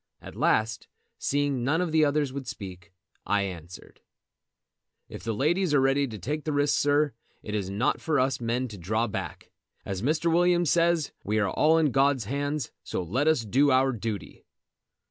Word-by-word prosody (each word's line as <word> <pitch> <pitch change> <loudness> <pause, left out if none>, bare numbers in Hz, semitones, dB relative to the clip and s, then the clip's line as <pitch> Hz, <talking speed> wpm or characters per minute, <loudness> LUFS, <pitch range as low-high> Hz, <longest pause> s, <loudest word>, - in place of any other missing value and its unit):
At - - -11
last, 110 +1 +1 0.3
seeing 140 -3 0
none 145 +6 +1
of 180 -3 -1
the 160 0 +4
others 145 -2 +1
would 135 -2 -6
speak, 95 -5 -8 0.4
I 105 -1 +2
answered: 90 -2 -9 1.1
"If - - -10
the 115 - -2
ladies 160 - +1
are - - +5
ready 135 +1 +2
to 110 -3 -7
take 150 +8 -4
the 155 - -2
risk, 145 0 +2
sir, 145 -1 +2 0.3
it 105 - -6
is 100 -3 -2
not 100 +6 0
for 155 -3 +1
us 130 -1 0
men 120 +2 -1
to 105 -3 -9
draw 110 +7 0
back. 105 - -6 0.3
As 95 -1 -4
Mr. 160 +6 +1
Williams 175 -1 +3
says, 170 -3 +2
we 105 +2 -1
are 100 -3 +1
all 160 +1 +3
in 155 -4 +2
God's 135 -2 +2
hands, 145 +4 -2
so - - -3
let 125 - -1
us 155 -8 +2
do 135 +7 +3
our 135 0 +4
duty." 110 -4 -5
135 Hz, 185 wpm, -27 LUFS, 110-150 Hz, 1.1 s, are